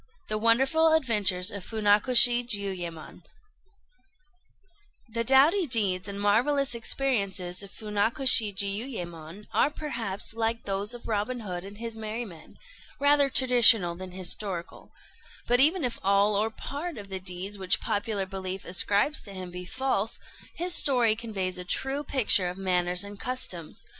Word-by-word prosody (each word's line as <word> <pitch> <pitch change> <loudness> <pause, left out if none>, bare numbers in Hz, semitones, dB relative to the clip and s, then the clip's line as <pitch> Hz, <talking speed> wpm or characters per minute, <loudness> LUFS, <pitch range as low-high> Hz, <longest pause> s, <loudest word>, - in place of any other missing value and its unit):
THE 215 0 -2
WONDERFUL 270 +8 +3
ADVENTURES 210 -9 +1
OF 200 -2 -7
FUNAKOSHI 230 +4 +4
JIUYÉMON 185 -7 -5 1.9
The 230 +1 -3
doughty 290 - +4
deeds 195 -6 +1
and 200 0 -6
marvellous 250 +7 +1
experiences 200 -7 -1
of 200 - -9
Funakoshi 215 +2 +3
Jiuyémon 195 -4 -5
are - - +3
perhaps, 235 -11 -5
like 225 0 -2
those 200 +3 -3
of 240 - -11
Robin 230 +3 -2
Hood 180 -4 -6
and 200 +1 -11
his 230 0 -6
Merry 220 +2 -5
Men, 165 -6 -14 0.4
rather 285 0 +4
traditional 240 -8 +5
than 185 +1 -9
historical; 185 -1 -3 0.5
but 245 +1 +2
even 310 +5 +4
if 245 -2 -3
all 200 +1 +2
or 215 +2 +1
part 290 +8 -7
of 200 -2 -10
the 190 -1 -5
deeds 185 +2 -4
which 185 -1 0
popular 205 -1 -2
belief 190 0 -6
ascribes 200 - +1
to 200 - -10
him 185 -2 -8
be 180 +1 -8
false, 230 -1 -2 0.4
his 350 +1 +1
story 245 -8 +4
conveys 195 -6 -4
a - - -4
true 270 +10 -2
picture 215 -10 +3
of 180 - -8
manners 180 -1 0
and 205 0 -10
customs. 185 -10 -5
210 Hz, 145 wpm, -27 LUFS, 190-245 Hz, 1.9 s, traditional